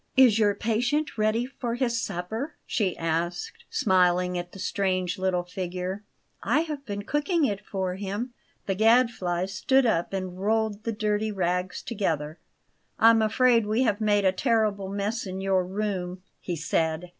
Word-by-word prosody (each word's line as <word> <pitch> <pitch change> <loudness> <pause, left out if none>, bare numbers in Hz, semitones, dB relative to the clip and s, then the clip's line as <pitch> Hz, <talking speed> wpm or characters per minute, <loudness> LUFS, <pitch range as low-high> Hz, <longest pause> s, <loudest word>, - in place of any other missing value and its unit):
"Is 245 -5 +6
your 205 -2 +3
patient 245 +8 0
ready 215 +2 +1
for 250 -3 -4
his 235 -2 0
supper?" 220 - -4
she 195 -6 -1
asked, 165 +2 -2
smiling 180 -2 +2
at 175 0 -4
the - - -11
strange 185 -2 -1
little 185 -1 0
figure. 180 +2 -4 0.4
"I 260 +9 +2
have 300 -4 -5
been 205 -1 -4
cooking 295 - +1
it 205 -4 -2
for 190 -3 -3
him." 205 +6 -4 0.3
The 195 - 0
Gadfly 220 -5 +3
stood 255 +8 +2
up 175 -7 +1
and 185 -2 -4
rolled 220 +1 0
the 230 - 0
dirty 215 0 -1
rags 180 -1 -1
together. 160 -8 -2 0.6
"I'm 225 0 +6
afraid 230 0 +3
we 220 +4 +2
have 215 -3 +1
made 205 -2 +2
a 190 - +5
terrible 210 -2 0
mess 205 +2 -2
in 190 0 -5
your 190 -1 +2
room," 185 -2 -3 0.2
he 175 - -4
said. 160 +1 -1
200 Hz, 155 wpm, -26 LUFS, 185-225 Hz, 0.6 s, Is